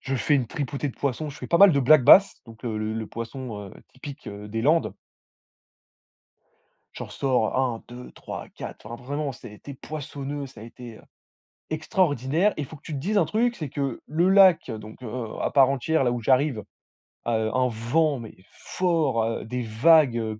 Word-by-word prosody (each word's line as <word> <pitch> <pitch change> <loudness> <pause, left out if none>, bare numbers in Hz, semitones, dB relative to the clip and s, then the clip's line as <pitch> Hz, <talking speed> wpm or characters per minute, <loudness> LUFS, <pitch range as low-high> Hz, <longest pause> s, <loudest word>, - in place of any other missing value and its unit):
je 135 - -3
fais 135 +3 +1
une 130 -4 +1
tripotée 145 +2 -4
de - - -8
poissons. 145 +2 -2
Je 145 - -11
fais - - -7
pas 170 - +2
mal 200 -3 +8
de 140 - +2
black-bass, 155 +8 +7
donc, 115 +1 -14
heu, 115 -3 -3
le 110 0 -3
le 110 -1 -4
poisson, 115 -3 -7
heu, - - -15 0.2
typique, 140 +3 -10
heu, 105 0 -8
des 115 +2 -3
Landes. 160 +3 +2 2.0
J'en - - -7
ressors 130 -4 0
1, 125 -4 -1
2, 125 +1 -10
3, - - -8
4. - - -9
Enfin, 120 +1 -9
vraiment, 145 +2 -3
ça 120 - -11
a - - -13
été 130 +7 -11
poissonneux. 145 -1 -6
Ça 130 -5 -14
a - - -9
été, 120 0 -11
heu, - - -18 0.7
extraordinaire! 160 - +1
Et 150 - -3
il - - -5
faut 155 - -11
que - - -22
tu 155 - -8
te 140 - -3
dises 200 +8 0
un - - +4
truc, 240 +2 0
c'est 155 -5 -5
que 140 -3 -3
le 170 +5 +1
lac, 190 -8 +5
donc 110 +2 -9
heu, 120 0 -5
à - - -1
part 135 -2 +5
entière, 140 +2 0
là 120 - +1
où 120 - -3
j'arrive, 130 +2 +2 0.7
heu, 110 -2 0
un 130 0 +2
vent, 130 +6 0
mais 115 -2 -10 0.2
fort, 160 -10 -1
heu, 115 -1 -3
des 125 +2 -4
vagues, 125 +3 +4
heu, 110 -2 -3
135 Hz, 205 wpm, -25 LUFS, 115-155 Hz, 2.0 s, mal